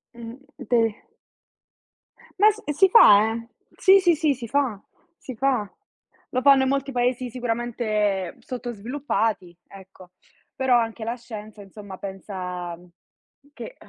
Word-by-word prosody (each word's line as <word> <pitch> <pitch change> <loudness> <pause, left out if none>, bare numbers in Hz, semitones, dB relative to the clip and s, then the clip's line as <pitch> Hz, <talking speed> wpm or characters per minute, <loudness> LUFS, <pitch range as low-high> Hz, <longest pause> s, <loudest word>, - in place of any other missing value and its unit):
Mh. 230 0 -9 0.2
De 225 -3 +1 1.4
Ma 425 +2 +7
s 430 - -12
si 380 +6 +4
fa, 215 - +7
eh! 230 +1 -6 0.3
Si, 390 0 +6
si, 350 -2 +3
sì, 305 -2 +1
si 240 -2 -8
fa. 250 -5 -1 0.4
Si 260 - -9
fa. 245 -4 0 0.6
Lo 255 - -1
fanno 275 -1 +6
in 265 - 0
molti 275 0 -1
paesi 250 0 -1
sicuramente 225 -6 -2
sottosviluppati, 230 -6 -3
ecco. 190 -2 -15 0.4
Però, 260 -2 +2
anche 225 -1 -2
la 235 +2 -2
scienza, 215 -3 -10
insomma, 195 -1 -11
pensa 180 -3 -6 0.8
che - - -9
230 Hz, 125 wpm, -23 LUFS, 205-260 Hz, 1.4 s, Ma